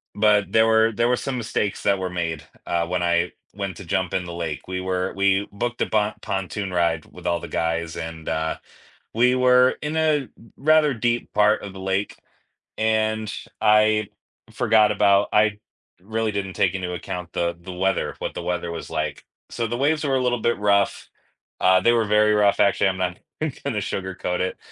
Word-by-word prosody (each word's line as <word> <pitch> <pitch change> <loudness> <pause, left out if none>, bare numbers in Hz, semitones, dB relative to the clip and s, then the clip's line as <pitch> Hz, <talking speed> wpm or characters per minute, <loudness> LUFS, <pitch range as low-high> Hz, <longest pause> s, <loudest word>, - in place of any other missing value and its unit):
but 105 -2 +3
there 110 +1 +4
were 110 0 +4
there 115 +2 +1
were 125 - +3
some 135 0 -3
mistakes 110 -3 -2
that 100 - +2
were 95 -1 -2
made, 85 -3 -3 0.2
uh, 85 -1 0
when 90 0 -1
I 85 0 +1 0.2
went 100 -3 -5
to 100 - -9
jump 95 0 -1
in 90 - -1
the 85 - -7
lake. 85 -3 -5
We 95 0 -3
were 95 0 -2
we 100 +1 +2
booked 120 +4 -3
a - - +3
bon 105 0 +1
pontoon 95 0 -3
ride 85 -2 +1
with - - -15
all 85 0 +1
the - - -8
guys, 80 0 -2
and, 80 -1 -7
uh, 80 0 -1 0.6
we 125 +3 +3
were 125 0 +4
in 150 +1 -3
a 155 -2 +2
r 135 - -10 0.3
rather 155 0 +4
deep 120 0 -1
part 105 +1 +3
of 100 -2 -7
the 95 - -10
lake, 95 +1 -2 0.6
and 110 -1 0 0.3
I 105 0 +4 0.4
forgot 110 -2 +3
about 100 -1 +3
I 105 0 +3 0.4
really 110 +3 -2
didn't 100 -2 -3
take 90 0 +1
into 90 -2 -3
account 90 0 -6
the 85 0 -1
the 90 +2 -9
weather, 95 +2 -1
what - - -4
the - - -6
weather 90 -1 -2
was 85 - -7
like, 75 +1 -3 0.3
so, 115 -1 -2
the 120 - -3
waves 150 +4 +1
were 135 -2 +1
a 130 - +1
little 120 -1 +1
bit 120 +1 +1
rough 100 -1 +1 0.5
uh, 95 0 +5
they 120 - +4
were 115 -2 +2
very 105 0 +3
rough, 105 -1 +3
actually, 100 -1 +3
I'm 95 - -3
not 90 -1 -2 0.2
even 155 -3 -1
gonna 135 -6 -1
sugarcoat 95 -2 -3
it. 95 - -2
100 Hz, 200 wpm, -23 LUFS, 90-110 Hz, 0.6 s, uh